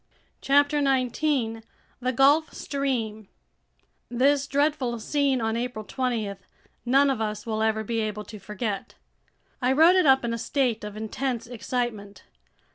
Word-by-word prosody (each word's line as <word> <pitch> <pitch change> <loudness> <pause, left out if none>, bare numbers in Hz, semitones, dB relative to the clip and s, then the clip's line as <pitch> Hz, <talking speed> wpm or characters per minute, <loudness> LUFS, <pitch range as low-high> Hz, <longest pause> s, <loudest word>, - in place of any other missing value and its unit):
CHAPTER 285 +1 +3
19 260 -3 0 0.4
The 255 0 -1
Gulf 280 +5 +4
Stream 230 -7 -3 0.8
THIS 275 +3 +2
DREADFUL 285 -5 0
SCENE 275 +1 0
on 225 0 0
April 235 -2 -4
20 225 -6 -2 0.5
none 275 +2 +4
of 245 -4 -2
us 210 -1 -3
will 220 -1 -2
ever 220 0 +1
be 230 +1 -2
able 210 -1 -3
to 210 +1 -10
forget. 210 +1 -5 0.7
I 250 +1 +2
wrote 325 +6 +6
it 365 -5 +4
up 265 -2 +5
in 230 - -1
a 230 - -3
state 245 -4 0
of 210 0 -7
intense 230 +2 -3
excitement. 235 -4 -4
245 Hz, 140 wpm, -26 LUFS, 220-275 Hz, 0.8 s, wrote